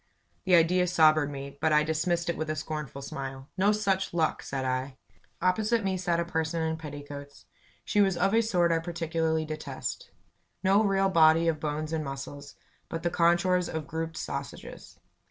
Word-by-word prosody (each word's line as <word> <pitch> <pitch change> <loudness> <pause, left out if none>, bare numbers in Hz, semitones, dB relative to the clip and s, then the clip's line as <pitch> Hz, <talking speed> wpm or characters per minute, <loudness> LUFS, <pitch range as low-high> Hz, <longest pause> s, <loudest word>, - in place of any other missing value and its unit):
The 185 -2 +5
idea 180 +2 +4
sobered 155 -3 +4
me, 140 0 -8
but 160 - +2
I 150 0 +5
dismissed 170 +2 0
it 170 - 0
with 155 0 -4
a 155 - -1
scornful 150 -2 -5
smile. 135 0 -6
"No 200 +2 +3
such 195 -4 0
luck!" 160 -2 +1
said 135 -1 -4
I. 130 +1 -2 0.5
Opposite 215 +5 +2
me 190 -1 0
sat 175 -2 0
a 170 - 0
person 160 0 -2
in 160 0 0
petticoats. 145 -2 -9 0.4
She 210 - +2
was 195 -3 +2
of 195 +3 +2
a 225 - +5
sort 180 -6 +2
I 165 - +2
particularly 165 -1 -1
detest. 155 - -5 0.5
No 195 +3 +4
real 195 -1 +2
body 165 -1 +5
of 160 -2 +1
bones 155 +1 -3
and 160 -1 -1
muscles, 140 +1 -7 0.3
but 165 - -5
the 175 - 0
contours 175 +2 +2
of 160 -2 -4
grouped 160 0 -4
sausages. - - -7
160 Hz, 175 wpm, -28 LUFS, 150-180 Hz, 0.5 s, The